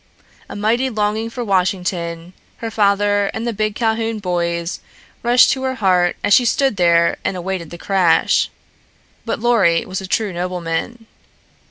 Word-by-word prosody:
A - - -7
mighty 230 +6 +1
longing 215 0 -1
for 245 +1 -5
Washington, 180 -3 -1 0.2
her 225 -1 -5
father 205 -1 +2
and 225 - -3
the 235 - -1
big 215 0 -2
Calhoun 225 -1 -1
boys, 170 -3 -2 0.4
rushed 240 +1 +5
to 265 - -2
her 260 0 -2
heart 180 -5 +2
as 205 - +3
she 250 - +6
stood 265 -1 +1
there 170 -1 +3
and 185 - -2
awaited 180 -2 -4
the 170 - -9
crash. 185 -3 +2 0.8
But 230 - -2
Lorry 215 -8 +2
was 190 0 -5
a 190 - -7
true 210 0 -1
nobleman. 180 +6 -4
200 Hz, 155 wpm, -19 LUFS, 180-225 Hz, 0.8 s, she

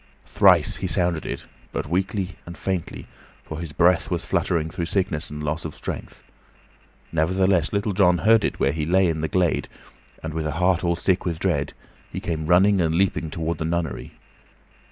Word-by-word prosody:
Thrice - - +4
he - - -3
sounded 85 -3 +1
it, - - -5 0.3
but - - -3
weakly 95 +3 -1 0.2
and 85 - -8
faintly, 95 -3 -3 0.4
for 80 - -7
his 85 -3 -6
breath 85 +3 +3
was - - -2
fluttering 80 -3 0
through 85 -2 -3
sickness 90 -5 -1
and 75 0 -6
loss 75 +2 -2
of 80 - -6
strength; - - -7 0.9
nevertheless, 90 +1 +2
Little 100 0 -1
John 90 -2 +4
heard 110 +3 +4
it - - -2
where 70 - +2
he 75 +1 -3
lay 90 +4 +3
in 80 -2 -1
the 80 - 0
glade, 90 0 0 0.5
and, 80 -1 -4
with 80 -1 -2
a 75 - -2
heart 90 +2 +1
all 85 -1 +1
sick 90 +2 0
with 85 -3 -2
dread, 80 -5 -1 0.4
he - - -4
came 80 -2 -3
running 95 +2 +4
and 80 -1 +1
leaping 90 -3 +1
toward 80 +1 -3
the 80 - -2
nunnery. 80 -6 -3
85 Hz, 185 wpm, -23 LUFS, 80-95 Hz, 0.9 s, Thrice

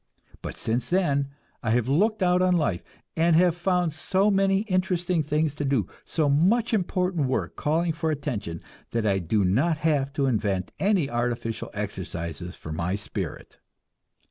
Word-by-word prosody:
But - - -6
since 115 +3 0
then 140 -7 +1 0.3
I 110 - -2
have 120 +1 +2
looked 205 +9 +2
out 180 0 +3
on 180 -1 +3
life, 100 - 0 0.3
and 165 0 +3
have 175 0 +4
found 175 -2 +1
so 190 +6 +2
many 195 0 +3
interesting 185 -4 0
things 150 0 0
to 145 - -4
do, 135 -8 +1 0.2
so 155 -3 0
much 200 +12 +3
important 180 -6 0
work 130 - -2
calling 165 +3 +1
for 160 0 -2
attention, 125 - -3 0.3
that 115 -2 0
I 100 -2 +2
do 95 +3 +1
not 140 - +2
have 140 -4 +2
to 140 -1 +1
invent 100 -7 0
any 195 -7 +2
artificial 120 -2 -2
exercises 90 -4 -5
for 80 - -9
my 85 +4 -1
spirit. 105 - -6
150 Hz, 160 wpm, -26 LUFS, 110-180 Hz, 0.3 s, have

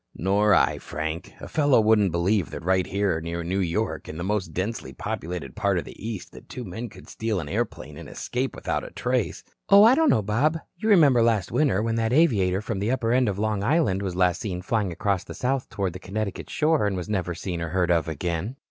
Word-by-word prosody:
"Nor 100 +4 +3
I, - - +2
Frank. 80 +2 -5
A - - -7
fellow 145 -5 +3
wouldn't 105 -3 +4
believe 85 +2 +1
that - - -7
right 95 0 +2
here 100 -5 0
near 85 +1 -4
New 95 +4 -1
York, 85 -3 -2
in 80 - -6
the 85 - -4
most 100 -1 -1
densely 90 - -4
populated 80 -1 -5
part - - +1
of - - -2
the - - -10
East, 110 -4 -6 0.2
two 125 - -6
men 110 +4 -6
could - - -14
steal 110 -3 -2
an 80 - -5
airplane - - -3
and - - -9
escape 130 +2 -3
without - - -2
a - - -7
trace." - - -2 0.3
"Oh, 200 +1 +8
I 230 +3 +8
don't 320 +2 +4
know, 110 - +3
Bob. 130 +11 +1 0.2
You 215 +5 -2
remember 145 - +6
last 115 -5 +2
winter 130 -9 +2
when 115 0 0
that 115 +1 0
aviator 105 - +3
from 105 -3 -3
the 105 +3 -1
upper 120 -3 0
end 125 -2 +3
of 100 - -3
Long 105 -1 -1
Island 125 - +2
was 95 -3 -3
last 90 -1 +2
seen 90 -3 -4
flying 105 -3 0
across 95 +2 -1
the - - -9
Sound 130 +1 -1
toward 95 -3 -2
the 95 - -7
Connecticut 100 +2 -4
shore 155 -8 +2
and 100 - -1
was 90 - -4
never 90 -4 -2
seen 85 -1 -4
or 85 - -3
heard 90 0 +1
of 85 -2 +2
again." 85 - -3
100 Hz, 230 wpm, -25 LUFS, 90-115 Hz, 0.3 s, Oh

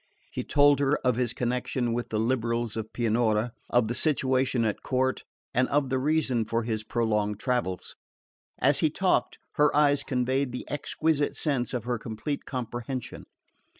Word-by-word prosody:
He - - -3
told 145 -1 +4
her 140 +1 +2
of 125 -2 +3
his 120 -1 0
connection 125 0 -1
with 120 +1 -3
the 110 - -1
liberals 115 -1 0
of 110 -1 -5
Pianura, 115 -1 +1 0.2
of 120 -2 +3
the 120 - -1
situation 130 -4 +1
at 105 - -1
court, 130 0 0 0.3
and 130 +1 +3
of 140 -2 +1
the 130 0 +1
reason 135 -4 +1
for 115 +1 -1
his 110 -1 -2
prolonged 105 -3 0
travels. 120 -8 -2 0.6
As - - +3
he - - +3
talked - - +1 0.2
her 150 0 +5
eyes 145 -1 +4
conveyed 130 0 0
the 125 - -5
exquisite 150 +1 0
sense 135 -6 0
of 125 -4 -2
her 120 -1 -2
complete 115 +6 -4
comprehension. 125 0 -5
125 Hz, 160 wpm, -27 LUFS, 115-135 Hz, 0.6 s, her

